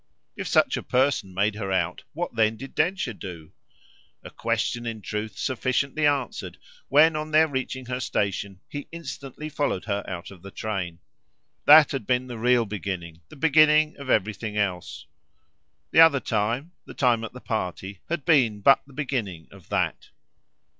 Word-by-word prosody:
If - - -5
such - - +3
a - - -3
person 125 -6 +1
made 100 +3 +1
her 100 -2 -4
out 90 -2 0
what 170 -3 -4
then 110 0 +2
did 135 +4 -9
Densher 175 -5 0
do? 85 -6 -9 0.7
a - - -10
question 120 0 -2
in 115 -1 -4
truth 105 0 -4
sufficiently 140 +3 0
answered 140 -4 -2 0.3
when, 155 +3 +5
on 155 0 -3
their 155 +1 +5
reaching 130 -2 -4
her 125 +1 -3
station, 100 -4 -2
he 145 0 -7
instantly 150 -2 -7
followed 145 -10 -2
her 100 -1 -2
out 90 0 -6
of 95 -3 -14
the 100 - -10
train. 95 -5 -4 0.7
That 150 0 +9
had 135 -7 -4
been 125 0 +1
the 120 -3 -7
real 120 0 +3
beginning 90 -5 -5
the - - -13
beginning 155 +1 +4
of 140 -2 -9
everything 105 0 0
else; 90 -7 -2 0.9
the - - +4
other 160 -4 +8
time, 115 +8 -1
the - - -11
time 120 -4 +2
at 115 - -6
the 125 - -9
party, 95 -4 -4
had 170 -3 -3
been 125 -11 +3
but 135 +7 +6
the 140 - -16
beginning 115 - -4
of - - -16
THAT. - - -1
120 Hz, 165 wpm, -25 LUFS, 100-145 Hz, 0.9 s, That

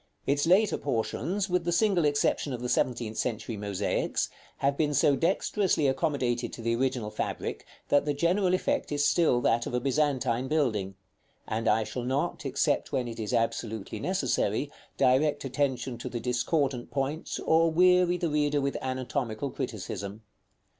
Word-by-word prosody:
Its 145 +2 +1
later 200 +5 +4
portions, 145 - -1
with 180 -2 0
the 175 - -1
single 180 -2 +3
exception 145 -1 +1
of 120 - -5
the - - -1
seventeenth 115 -4 0
century 115 -1 -2
mosaics, 100 -1 -1 0.3
have 140 +1 +1
been 150 -1 0
so 140 +1 +4
dexterously 180 0 +1
accommodated 130 -4 0
to - - -9
the 115 0 +1
original 125 -3 -1
fabric - - -4 0.2
that 145 0 +4
the 145 0 0
general 180 +4 +2
effect 185 - -1
is 145 0 +1
still 145 -5 +3
that 115 0 +1
of - - -3
a - - +2
Byzantine 130 -2 0
building; 110 -11 0 0.5
and 115 +1 -2
I 110 +1 +3
shall 110 +4 -5
not, 140 +4 -1
except 135 - 0
when 130 -3 -1
it 115 -1 -7
is 110 +1 -3
absolutely 115 -3 -2
necessary, - - 0 0.3
direct 135 +3 +2
attention 130 -2 -1
to - - -5
the 120 - -4
discordant 125 +2 0
points, 140 +4 -2
or 165 +1 +3
weary 180 +1 +4
the 175 - -1
reader 150 -1 +1
with 140 0 -1
anatomical 130 -1 -3
criticism. 100 -2 -5
135 Hz, 160 wpm, -28 LUFS, 120-155 Hz, 0.5 s, later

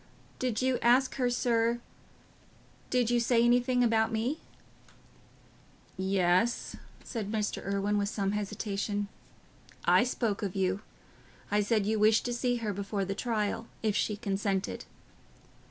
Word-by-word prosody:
"Did 250 -2 -1
you 260 -1 +2
ask 250 +3 +4
her, 250 -2 +2
sir... 235 -1 +1 1.1
did 245 -2 +2
you 240 - +3
say 235 0 +3
anything 245 +1 +3
about 225 -1 +2
me?" 235 +7 -1 1.6
"Yes," 190 +3 +1 0.3
said 215 -5 -4
Mr. 215 -1 -2
Irwine, 200 +1 0
with 200 0 0
some 200 -2 -1
hesitation, 205 0 -2 0.8
"I - - +6
spoke 230 -4 -1
of 200 -2 -3
you. 190 +1 0 0.7
I 210 0 +3
said 210 0 +1
you 215 +1 +1
wished 215 +1 +4
to 245 - -1
see 245 0 0
her 220 -3 -2
before 200 0 -2
the 195 - -2
trial, 225 0 -2 0.2
if 215 -2 +1
she 210 -1 0
consented." 195 -2 -2
220 Hz, 135 wpm, -30 LUFS, 200-240 Hz, 1.6 s, I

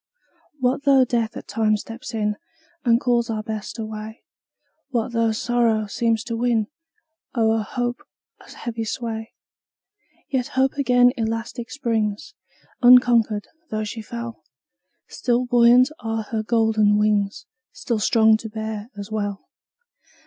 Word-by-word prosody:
What 260 +1 0
though 270 -2 +5
Death 230 -2 -1
at - - -9
times 215 -2 +1
steps 230 +1 -8
in, 210 -1 0 0.5
And 235 -1 +4
calls 240 -2 +1
our 215 -1 -2
Best 215 +1 -5
away? 220 0 -7 0.7
What 240 -2 -1
though 230 -1 +1
sorrow 225 -1 +1
seems 225 +1 0
to 235 -1 -4
win, 230 -2 +1 0.7
O'er 225 -1 +2
hope, 245 +3 -3 0.4
a - - -17
heavy 230 -1 -5
sway? 225 0 -4 0.9
Yet 255 -3 -1
Hope 265 0 +3
again 250 -3 +4
elastic 225 +1 -3
springs, 220 -6 -2 0.5
Unconquered, 240 -4 +5 0.2
though 215 0 -2
she 220 +2 -5
fell; 235 -3 -7 0.7
Still 245 0 0
buoyant 245 +2 +5
are 225 -1 -3
her 220 +1 -3
golden 220 -2 +2
wings, 210 +1 +1 0.3
Still 235 -3 -3
strong 220 0 +4
to 220 0 -8
bear 220 0 -5
us 200 +1 -7
well. 205 -2 -3
225 Hz, 130 wpm, -22 LUFS, 215-240 Hz, 0.9 s, though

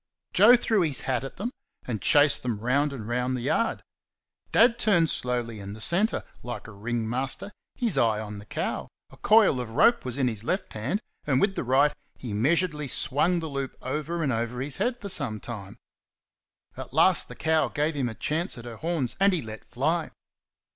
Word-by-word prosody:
Joe 245 - +8
threw 225 -4 +1
his 150 -6 0
hat 130 -1 -1
at 135 - -8
them, 230 +6 -3 0.3
and 110 -5 -3
chased 145 - +5
them 120 -4 -2
round 140 +6 +1
and 115 -6 -7
round 125 +2 -1
the - - -5
yard. 185 - 0 0.7
Dad 235 +1 +5
turned 170 - +3
slowly 120 -3 -2
in 100 0 -7
the 110 - -10
centre, 185 - 0 0.2
like 120 0 -6
a - - -9
ring 110 +2 -3
master, 135 - -3 0.2
his 235 -7 +1
eye 110 -2 +3
on 105 -1 -6
the 105 - -13
cow; - - -3 0.2
a - - -15
coil 210 - +5
of 120 - -6
rope 230 - +4
was 125 0 -4
in 135 - +2
this 110 -4 -2
left 185 - -2
hand, 130 - -2 0.3
and 135 -3 +3
with 200 +4 +2
the - - -3
right 135 +4 +3 0.2
he 120 -5 -6
measuredly 150 - +1
swung 150 +8 0
the 160 - -4
loop 140 -2 -4
over 155 +5 -3
and 135 -4 +1
over 120 +2 -2
his 135 +1 -4
head 245 0 -1
for 205 - -6
some 125 - -2
time. 100 -4 -8 1.0
At - - -8
last - - +4
the - - -10
cow 160 0 +2
gave 155 +2 -1
him 135 -4 -1
a 110 - -7
chance 160 - -2
at 120 - -9
her 115 -2 -8
horns, 160 -6 -1
and 200 +1 +5
he 170 - -1
let 110 -1 -8
fly. 155 +6 -1
135 Hz, 200 wpm, -27 LUFS, 120-170 Hz, 1.0 s, Joe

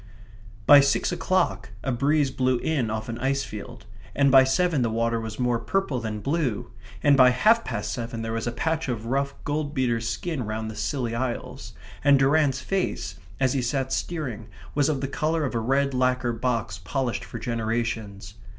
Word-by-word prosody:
By 145 - +9
six 140 +5 +2
o'clock 175 - 0
a 135 - -1
breeze 140 +3 +2
blew 130 -1 +1
in 130 -4 -1
off 110 0 -3
an 115 0 -5
icefield; 135 -6 -3 0.3
and 140 -1 +4
by 135 0 +8
seven 150 +3 +2
the 115 - +1
water 115 +1 0
was 110 -1 -6
more 125 -2 +1
purple 155 -1 -1
than 110 -2 -4
blue; 140 -4 -1 0.3
and 145 -1 +6
by 130 -2 +7
half 220 - +4
past - - -3
seven 115 -1 -4
there 115 0 -3
was 115 0 -2
a - - 0
patch 160 +4 -1
of 115 -3 -3
rough 140 +3 -1
gold 145 0 -2
beater's 120 -4 0
skin 160 -7 -3
round 110 0 -4
the - - -10
Scilly 120 -3 -2
Isles, 120 0 -4 0.3
and 140 -1 +6
Durrant's 135 -1 +3
face, 190 +7 -2 0.2
as 130 -2 +2
he 135 - 0
sat 130 +2 -1
steering, 130 -11 -3 0.3
was 145 0 +2
of 140 -4 -1
the 135 - -1
colour 155 +3 0
of 130 - -3
a 115 - 0
red 135 +4 +1
lacquer 125 -1 +1
box 115 -2 -2
polished 130 -4 -2
for - - -7
generations. 110 -4 -3
130 Hz, 185 wpm, -25 LUFS, 115-140 Hz, 0.3 s, By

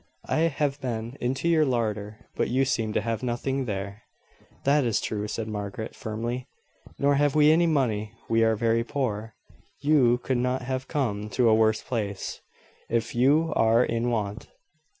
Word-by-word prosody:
"I - - +1
have 145 -1 -2
been 115 -1 -4
into 130 +6 -1
your 165 -2 +4
larder, 110 -5 -2
but - - 0
you 130 +3 +2
seem 115 -4 0
to - - +1
have 115 0 -2
nothing 130 +2 -2
there." 100 -1 -4 0.6
"That 140 +1 +3
is 115 -3 +1
true," 105 -1 -3
said 110 +1 -4
Margaret, 105 +1 -5
firmly; 120 +3 -4 0.5
"nor 140 0 +3
have 145 0 +2
we 150 0 +6
any 170 +2 +4
money. 115 -9 0
We 115 0 +3
are 110 0 +3
very 115 +1 +1
poor. 115 -5 -3 0.4
You 135 -5 +4
could 125 0 -1
not 125 +1 0
have 130 +1 -3
come 105 -8 -2
to 125 -2 +4
a - - +5
worse 110 0 +3
place, 105 -6 -4 0.5
if 115 0 -1
you 150 +6 +3
are 115 +2 +4
in 115 +1 -1
want." 110 -1 -3
120 Hz, 170 wpm, -26 LUFS, 110-135 Hz, 0.6 s, we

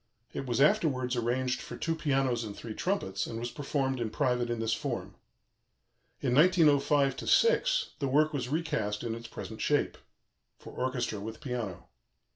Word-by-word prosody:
It 135 - -4
was 120 0 0
afterwards 130 -4 +3
arranged 125 +2 0
for 150 - -8
two 165 - -1
pianos 135 -6 +1
and 105 -2 -6
three 115 - -6
trumpets, 105 - -1
and 115 - -5
was 120 +1 -4
performed 135 -2 -1
in 115 -2 -1
private 125 -2 0
in 120 -1 -2
this 115 0 0
form. - - -3 1.1
In 125 -3 +1
1905 145 -4 +4
6 - - +4
the 140 - 0
work 155 +4 +3
was 125 -4 -2
recast 110 -10 -1
in 115 -2 -2
its 115 0 -7
present - - -8
shape - - +1 0.6
for - - -12
orchestra 125 -4 -2
with 110 +2 -7
piano. 120 - -5
130 Hz, 160 wpm, -30 LUFS, 115-145 Hz, 1.1 s, 1905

